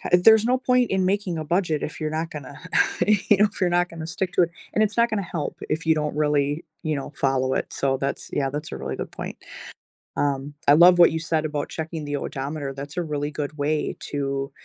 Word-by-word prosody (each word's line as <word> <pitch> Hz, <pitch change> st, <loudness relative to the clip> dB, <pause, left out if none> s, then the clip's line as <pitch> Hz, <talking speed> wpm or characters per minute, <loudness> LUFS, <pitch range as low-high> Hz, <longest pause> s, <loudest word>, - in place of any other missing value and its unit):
ha -, -, -4 dB
there's 220 Hz, +5 st, +7 dB
no 250 Hz, +2 st, +2 dB
point 250 Hz, -2 st, +2 dB
in 190 Hz, -1 st, +2 dB
making 190 Hz, -3 st, 0 dB
a 155 Hz, -, -3 dB
budget 170 Hz, -2 st, 0 dB
if 155 Hz, -, -5 dB
you're 155 Hz, -, -1 dB
not 160 Hz, +1 st, -2 dB
gonna, 145 Hz, -3 st, -8 dB, 0.5 s
you 205 Hz, -1 st, +3 dB
know, 210 Hz, +1 st, +5 dB
if -, -, -9 dB
you're 180 Hz, -, +3 dB
not 175 Hz, 0 st, +2 dB
gonna 160 Hz, -1 st, -7 dB
stick 180 Hz, +2 st, -3 dB
to -, -, +5 dB
it, 170 Hz, -, +1 dB, 0.2 s
and 215 Hz, -, +3 dB
it's 210 Hz, -, -3 dB
not 235 Hz, 0 st, +3 dB
gonna 215 Hz, -2 st, 0 dB
help 155 Hz, -4 st, -3 dB
if 160 Hz, +1 st, -2 dB
you 160 Hz, -, +5 dB
don't 150 Hz, -1 st, -2 dB
really, 150 Hz, +1 st, +1 dB, 0.2 s
you 155 Hz, -, 0 dB
know, 140 Hz, +1 st, -6 dB
follow 130 Hz, -1 st, +1 dB
it, -, -, -2 dB
so 135 Hz, -1 st, 0 dB
that's 140 Hz, 0 st, -3 dB
yeah, 135 Hz, -2 st, 0 dB
that's 150 Hz, +3 st, -5 dB
a -, -, -3 dB
really 65 Hz, 0 st, -4 dB
good -, -, -5 dB
point. -, -, -7 dB, 0.8 s
Um, 140 Hz, 0 st, -1 dB
I 145 Hz, -, +8 dB
love 175 Hz, +3 st, +7 dB
what 170 Hz, -, +8 dB
you 160 Hz, -, -2 dB
said 160 Hz, -1 st, 0 dB
about 150 Hz, -1 st, -3 dB
checking 160 Hz, -1 st, -5 dB
the 145 Hz, 0 st, -2 dB
odometer, 140 Hz, +1 st, -4 dB
that's 145 Hz, +5 st, -8 dB
a -, -, +1 dB
really 150 Hz, -2 st, -3 dB
good 150 Hz, +1 st, -5 dB
way 150 Hz, +1 st, -1 dB
to 140 Hz, -1 st, -2 dB
155 Hz, 240 wpm, -24 LUFS, 145-180 Hz, 0.8 s, I